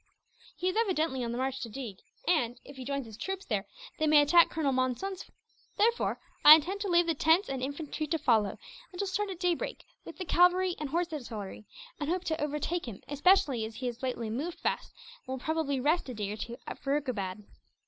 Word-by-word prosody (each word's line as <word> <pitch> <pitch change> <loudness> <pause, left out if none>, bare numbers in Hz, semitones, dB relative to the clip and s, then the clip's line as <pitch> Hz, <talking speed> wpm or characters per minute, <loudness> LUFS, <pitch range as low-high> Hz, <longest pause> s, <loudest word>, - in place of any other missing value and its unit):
He 365 - -2
is 370 - 0
evidently 325 - +1
on 235 - -2
the 235 - -3
march 265 +1 -1
to 230 - -5
Deeg 225 -5 -7 0.3
and, 245 -8 +1
if 280 - -11
he 260 - -7
joins 275 0 -3
his 220 -2 -11
troops 385 +5 -4
there, 205 -4 -2 0.3
they 310 - +2
may 300 0 +7
attack 335 +4 +6
Colonel 310 -4 0
Monson's 260 +10 -1
force. - - -15 0.4
Therefore 465 +3 +2 0.2
I 300 - +13
intend 365 +6 -2
to 410 - -1
leave 345 -1 +4
the 335 - +1
tents 320 +5 +3
and 265 -1 -3
infantry 290 +3 -4
to 325 - 0
follow; 225 -9 +2 0.3
and 355 - -10
shall 400 - 0
start 395 +2 -1
at 370 -3 -6
daybreak, 355 -2 -1 0.2
with 335 - -10
the 370 - -4
cavalry 360 +1 +4
and 300 -2 -3
horse 340 +2 -1
artillery; 220 -7 -6 0.3
and 295 -1 -2
hope 360 +1 0
to 315 -3 -1
overtake 300 +2 -2
him, 210 -5 -8
especially 290 - +3
as 220 0 -6
he 255 - -5
has 245 -1 -4
lately 240 -4 -3
moved 300 +9 -3
fast, - - -2 0.3
and 260 - -7
will - - -3
probably 315 -4 0
rest 300 +3 +1
a 250 - -5
day 205 -1 -3
or 210 - -5
two 235 +2 -6
at - - -7
Furukabad." 245 -9 -2
295 Hz, 220 wpm, -30 LUFS, 250-350 Hz, 0.4 s, I